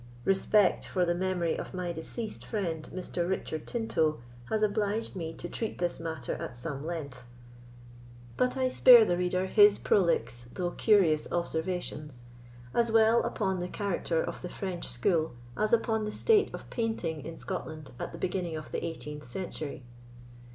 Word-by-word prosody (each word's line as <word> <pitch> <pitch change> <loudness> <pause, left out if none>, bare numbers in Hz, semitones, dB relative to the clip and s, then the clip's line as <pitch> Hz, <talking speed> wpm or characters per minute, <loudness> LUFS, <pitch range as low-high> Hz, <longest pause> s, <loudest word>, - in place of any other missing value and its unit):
Respect 195 0 +3
for 180 -2 +1
the 175 - +2
memory 175 -2 0
of - - -6
my 180 -1 -2
deceased 210 +7 -6
friend, 170 -8 -3
Mr. 180 -1 -3
Richard 160 -4 -3
Tinto, 160 - 0 0.3
has 215 -1 +1
obliged 210 +1 0
me 165 -3 -4
to 175 - -6
treat 220 +4 -4
this 175 -1 -1
matter 160 -6 -4
at - - -6
some 140 +3 -5
length; 150 -6 -5 1.1
but 250 +1 +1
I 260 -1 +2
spare 245 -2 +8
the 175 - +1
reader 180 +1 0
his 205 +1 +6
prolix 165 -10 +1
though 175 -1 -1
curious 180 -9 +3
observations, 160 -6 -3 0.5
as 235 -1 +2
well 225 +1 +5
upon 190 -3 -1
the 180 +1 -3
character 175 -5 -1
of - - -5
the 180 - -5
French 185 -2 -4
school 155 +6 +1 0.2
as 215 +7 0
upon 220 -2 +2
the 210 - -3
state 430 - +3
of - - -8
painting 225 -10 -2
in 165 - -7
Scotland 155 -2 -6
at - - -4
the - - -8
beginning 175 -3 -2
of 155 - -8
the - - -2
18th 150 -3 -6
century. 150 -1 -5
180 Hz, 160 wpm, -30 LUFS, 160-210 Hz, 1.1 s, spare